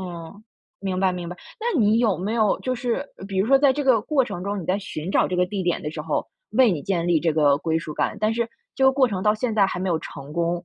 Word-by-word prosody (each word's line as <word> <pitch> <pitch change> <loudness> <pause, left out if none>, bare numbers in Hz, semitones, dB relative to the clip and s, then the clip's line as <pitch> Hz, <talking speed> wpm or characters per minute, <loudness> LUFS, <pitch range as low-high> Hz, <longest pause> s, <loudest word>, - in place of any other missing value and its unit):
嗯。 180 +3 -8 0.4
明 190 -2 -2
白 190 -1 +3
明 175 -2 -5
白， 180 - -7 0.2
那 455 - 0
你 215 +1 +4
有 220 -6 +2
没 205 +5 -3
有 215 -3 +2
就 255 - -2
是 250 +2 -2 0.2
比 195 -1 -3
如 200 +5 +1
说 270 - +6
在 280 -1 +5
这 290 +2 -2
个 255 -5 +4
过 265 +3 +1
程 180 -6 -6
中， 200 -2 -3
你 - - -8
在 185 +4 0
寻 180 -3 -6
找 - - +3
这 180 - -3
个 180 - +3
地 195 +1 -4
点 175 - 0
的 150 - -3
时 155 - -6
候， 150 -1 -1 0.3
为 255 -4 +5
你 165 - -1
建 175 -3 -1
立 170 -2 +4
这 165 0 +1
个 145 -2 +3
归 160 +1 -1
属 155 -2 -6
感， - - -1
但 215 +1 +2
是 235 0 -1 0.3
这 265 - +2
个 265 - +6
过 265 -2 +3
程 195 -4 -3
到 210 +2 +3
现 230 +1 -2
在 200 - +5
还 180 - -4
没 190 - -1
有 165 -3 +1
成 140 -1 -9
功， 170 +1 -1
195 Hz, 310 characters per minute, -23 LUFS, 170-230 Hz, 0.4 s, 说